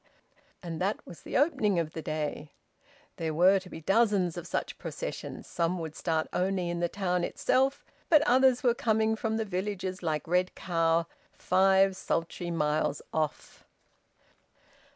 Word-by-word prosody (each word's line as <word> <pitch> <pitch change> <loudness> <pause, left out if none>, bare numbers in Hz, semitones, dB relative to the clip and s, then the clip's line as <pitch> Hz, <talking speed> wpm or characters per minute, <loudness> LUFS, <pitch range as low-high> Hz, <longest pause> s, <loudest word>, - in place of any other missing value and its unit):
And 165 -1 -5
that 195 +3 -1
was 170 - -11
the - - -2
opening 270 - +2
of 165 -2 -1
the 160 - -5
day. 155 -1 -4 0.6
There 160 -2 -2
were 185 +4 +5
to 185 -1 -13
be 160 - -8
dozens 195 -2 +2
of 175 -1 -6
such - - -3
processions. - - -6
Some 170 +1 -1
would 160 -3 -6
start 160 -2 0
only 185 -1 0
in 175 - -3
the 175 0 0
town 180 -3 -1
itself; 270 +2 +1 0.2
but 305 -3 +6
others 260 -1 +4
were 245 -2 +4
coming 220 -1 +1
from 220 0 -2
the 220 - -1
villages 190 -1 -3
like 155 -3 -2
Red 180 +2 +1
Cow, 165 -2 +1 0.3
five 190 +1 +3
sultry 175 0 -3
miles 150 -3 0
off. 155 -2 -3
180 Hz, 150 wpm, -29 LUFS, 165-210 Hz, 0.6 s, but